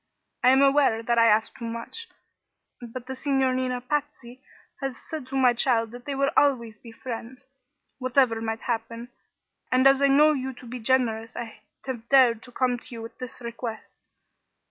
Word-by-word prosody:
I 250 - +6
am 265 +2 +5
aware 275 -5 +3
that 235 0 +1
I 230 - +6
ask 220 0 +2
too 235 - -7
much; 230 - -6 0.7
but 240 +1 -8
the 265 - -5
Signorina 260 -2 0
Patsy 265 -2 -4 0.4
has 270 -3 -4
said 310 -5 -8
to 270 - -6
my 255 -2 +5
child 230 -2 +2
that 245 0 -11
they 280 - -3
would 275 +1 +1
always 235 -7 +2
be 230 - -12
friends, 250 +2 -8 0.5
whatever 255 -3 +2
might 225 0 -3
happen, 230 0 -4 0.6
and 255 +1 +3
as 270 0 +6
I 280 - +5
know 295 +3 +5
you 265 -2 -3
to 250 - -14
be 245 +1 -7
generous 230 -2 0
I 225 -2 -7 0.2
have 240 -3 -6
dared 250 -5 +5
to 245 - -14
come 245 0 0
to - - -14
you 225 - -7
with 230 - -11
this 255 0 -8
request. 235 -1 -8
250 Hz, 180 wpm, -25 LUFS, 230-265 Hz, 0.7 s, I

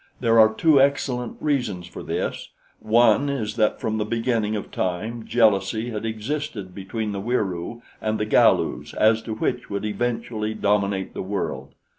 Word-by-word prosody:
There 115 -2 +4
are 110 0 +7
two 145 +4 +4
excellent 130 -3 0
reasons 120 - -1
for 90 - -9
this: - - -3 0.3
One 120 +5 +4
is 120 -7 -2
that 105 -1 +2
from 110 0 -2
the - - +1
beginning 115 -1 0
of 105 - -5
time 110 +6 -3
jealousy 110 +1 +2
has 105 -1 -4
existed 110 -2 -4
between 105 +3 -4
the 100 -1 -4
Wieroo 105 -1 -2 0.2
and 110 0 -1
the 105 - 0
Galus 110 - +2
as 110 +1 +4
to 110 -1 -5
which 120 +2 -2
would 100 +1 -3
eventually 110 -1 -2
dominate 100 -2 0
the - - -4
world. 100 +2 -4
110 Hz, 160 wpm, -23 LUFS, 105-120 Hz, 0.3 s, are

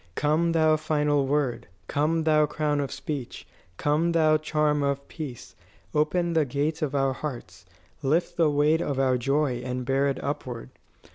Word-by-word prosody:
"Come, 160 +3 +1
thou 155 -1 +4
final 150 -2 +1
word; 140 -3 -1 0.2
Come, 160 +3 +1
thou 155 -1 +4
crown 150 -1 -1
of 140 -2 -2
speech! 140 -2 -6 0.3
Come, 155 +3 +1
thou 155 -2 +4
charm 150 -1 0
of 140 0 -1
peace! 145 -7 -8 0.4
Open 170 +3 +1
the 160 -1 +3
gates 145 +4 -2
of 145 -2 -1
our 135 -1 +2
hearts. 120 -11 -7 0.3
Lift 160 +5 0
the 165 -3 +3
weight 150 +3 +2
of 140 - -2
our 130 -2 +2
joy 135 -1 0
and 125 0 -3
bear 135 +2 +2
it 135 -2 -1
upward. - - -5
150 Hz, 160 wpm, -26 LUFS, 135-155 Hz, 0.4 s, thou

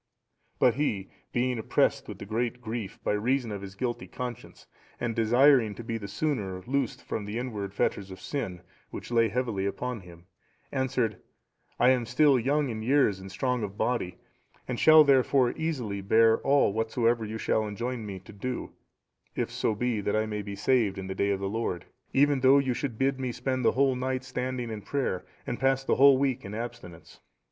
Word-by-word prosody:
But 125 - +4
he, 110 -8 -2 0.2
being 125 -1 0
oppressed 110 - +1
with 100 - -8
great 120 +3 -1
grief 115 -4 -5
by - - 0
reason 120 +3 0
of 100 -1 -5
his 100 -1 -9
guilty 120 +3 -3
conscience, 125 -2 -7 0.3
and 115 -2 -2
desiring 120 0 +4
to 120 - -8
be 115 0 -3
the 100 - -6
sooner 100 -7 -2
loosed 135 -2 -1
from 105 - -4
the 105 +2 -4
inward 110 -6 -4
fetters 100 0 -1
of 95 - -9
sin, 95 -11 -4 0.3
which - - -8
lay 115 -1 +3
heavy 115 -6 -1
upon 125 +4 -3
him, 85 -2 -15 0.5
answered, 125 -6 -1 0.6
"I 125 +1 +6
am 125 -3 +1
still 135 +1 +4
young 140 +3 +1
in 110 -2 -4
years 120 -5 +3
and 95 0 -9
strong 125 +5 -1
of 100 -1 -5
body, 90 -8 -1 0.5
and 125 -2 -3
shall, 155 0 +8
therefore, 135 -2 +4
easily 125 -11 -3
bear 110 +3 +4
all 140 -7 +3
whatsoever 115 +1 +1
you 110 +1 -4
shall 110 -1 0
enjoin 115 +3 -4
me 100 -3 -6
to 95 - -14
do, 125 +5 -4 0.6
if - - -2
so 110 - 0
be 120 -1 -1
that 100 - -1
I 110 0 +1
may 105 -1 -3
be 100 0 -6
saved 105 -2 +2
in 95 - -5
the 95 - -4
day 100 +1 0
of 100 -1 0
the 100 - -2
Lord, 105 -4 -3 0.3
even 140 0 +3
though 130 +2 +6
you 135 -2 +1
should 120 -2 -4
bid 135 +1 +1
me 130 -2 -2
spend 130 +1 -2
the - - +4
whole 135 0 +3
night 130 +1 -2
standing 125 -2 -3
in 110 -1 -5
prayer, 100 -8 -2 0.2
and 120 - -4
pass 135 +1 +2
the - - +1
whole 135 0 +7
week 135 -2 0
in 100 +1 -7
abstinence." 115 -7 -8
120 Hz, 195 wpm, -28 LUFS, 105-130 Hz, 0.6 s, shall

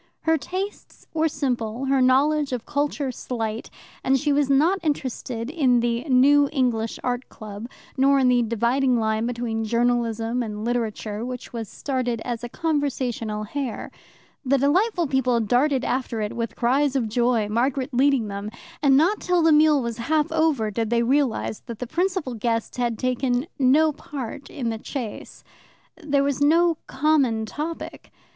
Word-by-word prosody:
Her 320 0 +2
tastes 375 +6 -6
were 320 0 +2
simple, 250 -5 -2
her 270 0 +2
knowledge 280 +2 +3
of 245 -2 -4
culture 285 -1 -1
slight, 225 -2 -4 0.3
and 270 0 +3
she 295 +1 +1
was 285 -1 +2
not 315 +8 +3
interested 260 -5 -3
in 265 -7 +3
the 235 0 0
New 285 +1 +5
English 240 -6 0
Art 250 0 -2
Club, 215 +1 -8 0.3
nor 275 +1 +4
in 265 -2 +3
the 250 -1 +4
dividing 235 +3 +1
line 220 +1 0
between 235 -2 -2
Journalism 235 0 0
and 215 -2 -4
Literature, 225 -2 -2
which 250 0 -7
was 225 -4 -5
started 255 -4 -2
as 240 -1 -4
a 240 - -5
conversational 255 -9 -2
hare. 255 +1 -4 0.5
The 275 +1 +2
delightful 350 - +2
people 260 -4 +1
darted 255 +5 +1
after 250 -3 -2
it 210 -1 -3
with 230 -1 -3
cries 270 +3 +1
of 245 -4 +1
joy, 235 -1 +1
Margaret 255 +5 -1
leading 260 -2 +3
them, 200 +1 -5 0.3
and 275 -2 +5
not 355 +8 +3
till 360 -2 +2
the 325 - +5
meal 300 -2 +5
was 235 0 -4
half 305 +6 0
over 315 -9 +1
did 225 +1 -2
they 235 0 +2
realize 260 -4 0
that 235 -2 -6
the 250 - -4
principal 350 -1 -1
guest 230 +1 -2
had 240 -2 -1
taken 255 +1 0
no 290 +4 +4
part 275 -1 -7
in 250 -6 -3
the 225 - -5
chase. 235 -3 -7 0.6
There 285 -2 +2
was 280 -1 -1
no 330 +2 +4
common 265 -6 +1
topic. 310 +8 -6
255 Hz, 160 wpm, -24 LUFS, 230-285 Hz, 0.6 s, New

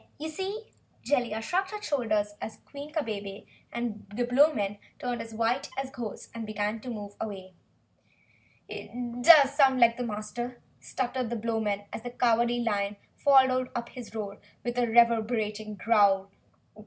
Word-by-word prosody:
You 315 +1 -4
see?" 385 +7 -4 0.4
Jellia 235 -6 0
shrugged 375 +8 0
her 425 - -5
shoulders 215 - 0
as 215 -1 -6
Queen 285 +1 -9
Kabebe 205 -9 -4 0.3
and 235 -4 -4
the 245 +1 +1
Blowmen 245 -6 +3 0.2
turned 245 -1 -3
white 230 +4 0
as 270 0 -3
ghosts 235 -5 -7
and 230 -1 -5
began 215 0 -2
to 250 - -8
move 205 -3 -6
away. 190 -4 -6 1.1
"It 245 0 -6
does 285 -3 +9
sound 270 -3 +4
like 235 -1 +5
the 250 - -2
Master," 235 +2 -5 0.2
stuttered 255 -1 -2
the 240 - -2
Blowman, 220 -3 -1
as - - -4
the 245 - -5
Cowardly 240 0 +2
Lion 205 -3 0 0.2
followed 260 -2 +4
up 235 0 -3
his 240 -3 -10
roar 205 -2 -5 0.2
with 245 0 -2
a 240 - +2
reverberating 220 -2 +2
growl. 200 -2 +3
235 Hz, 150 wpm, -28 LUFS, 215-255 Hz, 1.1 s, does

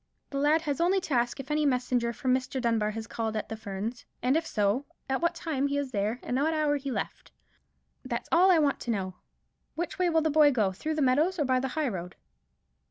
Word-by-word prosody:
The 275 - -2
lad 305 +3 +3
has 290 -1 -1
only 370 +3 +3
to 320 - -4
ask 240 +2 +1
if 270 +2 -6
any 300 0 +2
messenger 250 -3 +1
from 255 +2 0
Mr. 260 +1 -1
Dunbar 230 -3 +1
has 220 +1 -5
called 225 -1 -3
at 215 - -4
the 225 - -3
Ferns; 215 +2 -5 0.2
and 255 +3 +3
if 325 +1 0
so, 210 +6 0 0.2
at 265 +2 -1
what 340 0 +1
time 295 -5 -1
he 285 0 -1
was 280 -2 -2
there, 215 +2 -1
and 250 - -1
at - - +1
what 320 +2 +1
hour 300 -1 +2
he 280 0 -5
left. 255 - -4 0.7
That's - - -4
all 360 +3 +6
I 360 - +6
want 290 -3 +2
to - - -7
know. 190 -4 -2 0.6
Which 350 +3 -4
way 360 -1 +3
will 325 -1 +3
the 315 0 +1
boy 300 0 +6
go; 215 -7 +1
through 310 +12 -3
the 305 - +1
meadows, 300 +9 +2
or 300 - +1
by 255 -1 +2
the 265 - -1
high 310 -2 +1
road?" 180 -5 -5
270 Hz, 240 wpm, -28 LUFS, 235-310 Hz, 0.7 s, all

